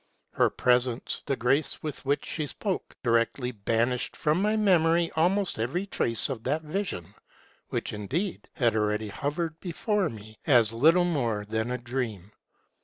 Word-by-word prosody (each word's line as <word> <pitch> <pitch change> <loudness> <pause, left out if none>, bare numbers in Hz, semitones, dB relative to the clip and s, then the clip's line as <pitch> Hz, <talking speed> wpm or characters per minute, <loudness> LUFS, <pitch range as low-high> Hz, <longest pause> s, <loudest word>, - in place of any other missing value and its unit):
Her - - +3
presence, 125 -1 +1
the 135 - +1
grace 135 +4 +1
with 155 -2 -5
which 145 +1 +1
she 155 -3 -3
spoke, 195 +5 -3
directly 120 +1 +1
banished 115 +3 0
from 155 +4 +1
my 210 +2 +2
memory 170 -5 +3
almost 180 - +1
every 140 - -1
trace 115 - 0
of 130 -5 -4
that 150 +5 0
vision, 155 - -3 0.6
which, - - -2
indeed, 145 - -3
had 120 -6 +2
already 105 0 0
hov 145 +8 -3
ered 165 -2 -3
before 190 +1 0
me 110 0 -11
as 120 -6 +5
little 165 +9 +5
more 120 -11 0
than 110 +2 -1
a 125 - -1
dream. 120 -6 -4
135 Hz, 155 wpm, -28 LUFS, 115-165 Hz, 0.6 s, as